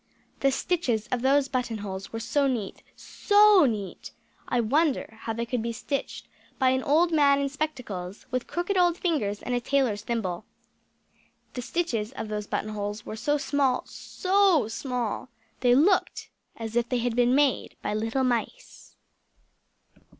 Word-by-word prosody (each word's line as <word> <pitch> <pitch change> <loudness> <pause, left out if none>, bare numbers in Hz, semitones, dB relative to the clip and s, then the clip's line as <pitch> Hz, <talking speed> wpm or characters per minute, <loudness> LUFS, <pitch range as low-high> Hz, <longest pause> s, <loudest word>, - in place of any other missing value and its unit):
The 275 - +3
stitches 255 - -1
of 250 -2 0
those 275 +1 +3
button 250 -4 -2
holes 195 -2 -6
were 225 - -4
so 280 +5 +1
neat 230 -7 -3
so 410 -5 +4
neat 205 -4 -5 0.4
I 245 - 0
wonder 255 -2 0
how 225 - -3
they 235 +1 -3
could 240 0 -2
be 230 +1 -2
stitched 275 +4 -4 0.3
by 260 -1 +3
an 260 0 +1
old 325 +6 +3
man 285 -3 +4
in 280 0 0
spectacles, 245 -11 -5
with 255 -1 -2
crooked 350 +3 -2
old 350 -1 +3
fingers, 225 - -1
and 250 - -3
a 245 - +2
tailor's 245 -6 +1
thimble. 215 -5 -3 1.1
The 250 - -4
stitches 250 -6 -2
of 220 - -6
those 210 -1 -4
button 215 - -3
holes 205 0 -4
were 215 - -6
so 295 +6 0
small 275 -3 +1
so 375 - +1
small 245 0 -3 0.3
they 245 -1 +4
looked 360 +8 +2 0.3
as 225 0 -6
if 240 0 +1
they 250 - +1
had 240 -1 -1
been 245 +1 +3
made 285 -3 +1
by - - -1
little 225 +5 -1
mice! 255 - -3
250 Hz, 160 wpm, -26 LUFS, 220-290 Hz, 1.1 s, so